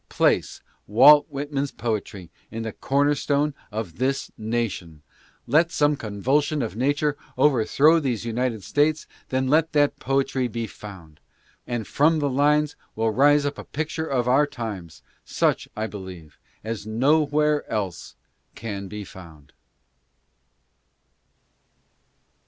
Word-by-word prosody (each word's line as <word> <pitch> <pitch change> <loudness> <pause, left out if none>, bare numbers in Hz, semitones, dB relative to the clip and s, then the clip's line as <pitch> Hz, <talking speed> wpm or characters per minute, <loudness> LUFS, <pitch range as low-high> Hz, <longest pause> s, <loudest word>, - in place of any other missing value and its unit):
Place - - +1 0.3
Walt 145 +8 +7
Whitman's 140 0 -3
poetry 105 -5 -4 0.2
in 115 +1 -5
the 110 - -4
corner 145 +2 +1
stone 145 +1 0 0.2
of 105 -4 -5
this 135 +2 -1
na 115 +2 -1
tion, 80 -7 -10 0.4
let 165 +3 +3
some 145 -2 +2
convulsion 135 +7 0
of 110 - -5
Nature 145 +4 0 0.2
overthrow 150 +4 +4
these 125 -7 -2
United 115 -2 -2
States, 150 +7 +1
and - - -28
then 130 0 0
let 155 +3 +2
that 145 -1 +2
poetry 135 -1 0
be 115 0 -4
found; 95 -7 -12 0.5
and 120 -3 -3
from 160 +3 +2
the 145 -2 0
lines 150 +2 +2 0.2
will 110 0 +1
rise 145 +5 +4
up 145 0 -3
a - - -6
picture 160 +1 -4
of 125 -4 0
our 140 +4 +4
times, 105 - -7 0.2
such, - - 0
I 110 - -1
believe, 95 -7 -9 0.2
as 110 -1 -5
nowhere 150 +5 +2
else 100 -6 -4 0.4
can 100 -3 -6
be 105 +2 -7
found. 80 -7 -14
130 Hz, 130 wpm, -24 LUFS, 110-145 Hz, 0.5 s, Walt